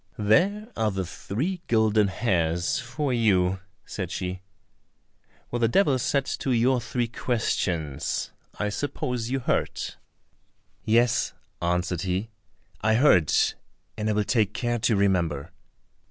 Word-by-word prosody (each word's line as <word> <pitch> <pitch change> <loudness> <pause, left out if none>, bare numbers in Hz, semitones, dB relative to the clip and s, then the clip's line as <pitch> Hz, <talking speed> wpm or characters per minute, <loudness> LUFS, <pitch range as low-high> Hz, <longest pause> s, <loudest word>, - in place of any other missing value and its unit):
"There 190 - +2
are 110 -1 +1
the 95 -2 -2
three 145 - -3
golden 110 -2 +3
hairs 85 -5 0
for 130 +3 -2
you," 95 -5 +2 0.3
said - - -5
she. 90 0 -4 1.1
"What 120 - -1
the 115 - +3
Devil 140 - +3
said 135 +2 +1
to 135 - -1
your 125 +1 +3
three 120 0 -1
questions, 85 - -1 0.3
I 105 - -1
suppose 125 +1 -3
you 135 +1 -1
heard?" - - 0 1.0
"Yes," 120 +2 +2 0.3
answered 90 0 0
he, 95 +4 -2 0.5
"I 110 +1 +3
heard, 90 - +5 0.6
and 110 0 -1
will 105 - +2
take 110 -1 +1
care 120 -1 -1
to 115 0 +2
remember." 85 -6 +1
110 Hz, 125 wpm, -26 LUFS, 95-120 Hz, 1.1 s, heard